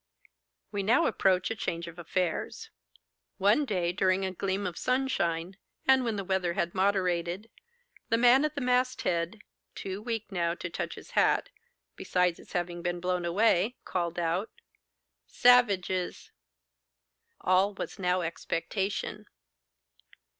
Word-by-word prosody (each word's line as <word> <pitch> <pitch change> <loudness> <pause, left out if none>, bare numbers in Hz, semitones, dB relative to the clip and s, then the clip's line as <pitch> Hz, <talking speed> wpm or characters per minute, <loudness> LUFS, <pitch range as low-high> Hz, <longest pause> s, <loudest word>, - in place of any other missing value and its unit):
We 205 - -1
now 235 - +3
approach 185 0 +2
a - - -1
change 170 -5 -3
of 170 +1 -10
affairs. 175 +1 -2 0.7
One 210 +10 +3
day 180 -7 0
during 185 +1 +1
a 190 - -2
gleam 195 +2 -2
of 180 -3 -3
sunshine, 190 -10 -1 0.3
and 265 -1 +5
when 230 -3 -1
the 200 - -3
weather 185 -2 0
had 170 0 -1
moderated, 185 +1 0 0.6
the 230 - +3
man 245 +4 +6
at 305 0 -1
the 285 - -3
masthead—too 210 -5 -2
weak 225 -2 -4
now 170 -2 0
to 180 -1 -6
touch - - -4
his - - -12
hat, - - +2 0.4
besides 180 -2 0
its - - -15
having 175 0 -2
been 175 0 -2
blown 180 0 -1
away—called 180 -2 +1
out, 175 +5 0 0.8
'Savages!' 200 -7 +3 1.1
All 190 +2 +2
was - - -6
now 180 0 +1
expectation. 185 +4 -3
190 Hz, 125 wpm, -29 LUFS, 175-220 Hz, 1.1 s, man